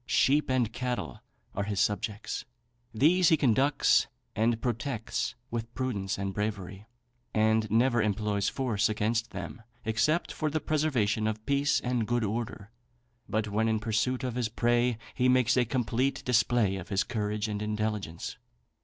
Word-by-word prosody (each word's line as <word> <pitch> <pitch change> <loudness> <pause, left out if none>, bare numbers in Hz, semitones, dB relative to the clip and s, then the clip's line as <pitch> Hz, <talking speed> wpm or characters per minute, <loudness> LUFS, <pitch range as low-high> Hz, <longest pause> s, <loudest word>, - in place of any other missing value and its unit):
Sheep 145 +2 +3
and 125 -4 +1
cattle 125 0 -3 0.3
are 100 - -2
his 100 -1 -2
subjects. 105 +1 -1 0.5
These 160 +9 +4
he 160 - +5
conducts 135 +2 +3 0.3
and 115 +1 +2
protects 120 -1 -2 0.2
with 115 0 -4
prudence 105 -7 -2
and 95 0 -3
bravery, 100 -1 -4 0.5
and 110 0 +3
never 120 +2 +3
employs 105 -1 0
force 120 -5 0
against 110 +2 0
them 115 - -7 0.2
except 120 +10 +1
for 155 - -1
the 155 +1 -1
preservation 125 -10 +1
of 110 0 -3
peace 140 0 +2
and 125 -3 -1
good 120 -1 +1
order. 110 0 -4 0.6
But 110 0 -1
when 110 +2 +1
in 110 -1 +1
pursuit 115 +4 0
of 125 -2 -2
his 120 -2 -1
prey, 120 +1 +1 0.2
he 125 0 +2
makes 125 -1 +4
a 125 -1 +3
complete 125 +2 -1
display 115 -4 +2
of 95 0 -8
his 100 -1 +1
courage 105 -2 -2
and 105 -1 -3
intelligence. 105 -4 -3
115 Hz, 150 wpm, -29 LUFS, 105-125 Hz, 0.6 s, he